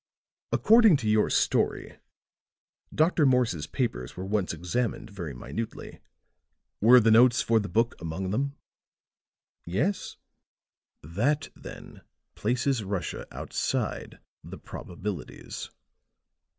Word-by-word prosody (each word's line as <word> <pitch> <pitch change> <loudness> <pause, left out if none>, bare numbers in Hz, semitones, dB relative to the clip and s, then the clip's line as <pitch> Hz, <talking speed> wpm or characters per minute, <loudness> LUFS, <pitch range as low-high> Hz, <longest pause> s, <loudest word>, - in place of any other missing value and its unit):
According 220 -7 +6
to 120 -5 -4
your 105 0 +3
story, - - 0 0.9
Dr. 160 0 +2
Morse's 125 - +2
papers 85 - -3
were 95 - -4
once 100 -1 0
examined 95 +7 -3
very 85 -9 -6
minutely. 70 - -6 0.8
Were 120 +4 +8
the 115 -1 +3
notes 120 +2 +6
for 115 -1 +3
the 100 -2 -4
book 115 +6 +1
among 85 +3 -4
them?" 140 +6 -1 1.1
"Yes." 150 - -2 0.9
"That 120 - 0
then - - -11 0.3
places 125 +1 0
Russia 95 -2 -4
outside - - -3 0.3
the - - -9
probabilities. 90 -1 -7
110 Hz, 100 wpm, -27 LUFS, 90-125 Hz, 1.1 s, Were